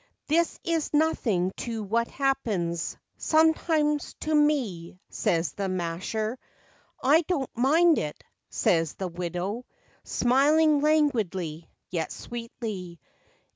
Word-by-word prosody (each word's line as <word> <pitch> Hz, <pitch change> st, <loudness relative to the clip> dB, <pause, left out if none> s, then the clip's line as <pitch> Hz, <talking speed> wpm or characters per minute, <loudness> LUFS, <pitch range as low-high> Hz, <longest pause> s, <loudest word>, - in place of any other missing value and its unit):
"This 335 Hz, +3 st, +1 dB
is 330 Hz, -3 st, -1 dB
nothing 220 Hz, -, +1 dB
to 225 Hz, -2 st, -4 dB
what 230 Hz, +4 st, 0 dB
happens 205 Hz, -12 st, -1 dB, 0.2 s
Sometimes, 315 Hz, -2 st, +2 dB
to 310 Hz, -, -1 dB
me," 250 Hz, -, +1 dB
says 165 Hz, -4 st, 0 dB
the 195 Hz, +2 st, -3 dB
masher. 185 Hz, +7 st, -2 dB, 0.3 s
" -, -, -31 dB
I 295 Hz, +5 st, +5 dB
do 345 Hz, -3 st, -1 dB
n't 265 Hz, -, -7 dB
mind 315 Hz, +7 st, +4 dB
it," 150 Hz, -1 st, -5 dB, 0.3 s
says 165 Hz, -3 st, +1 dB
the 190 Hz, -, -3 dB
widow, 180 Hz, +6 st, -4 dB, 0.4 s
Smiling 290 Hz, +4 st, +3 dB
languidly, 210 Hz, -, 0 dB, 0.2 s
yet 165 Hz, -3 st, -2 dB
sweetly. 220 Hz, -7 st, -6 dB
235 Hz, 110 wpm, -27 LUFS, 180-300 Hz, 0.4 s, I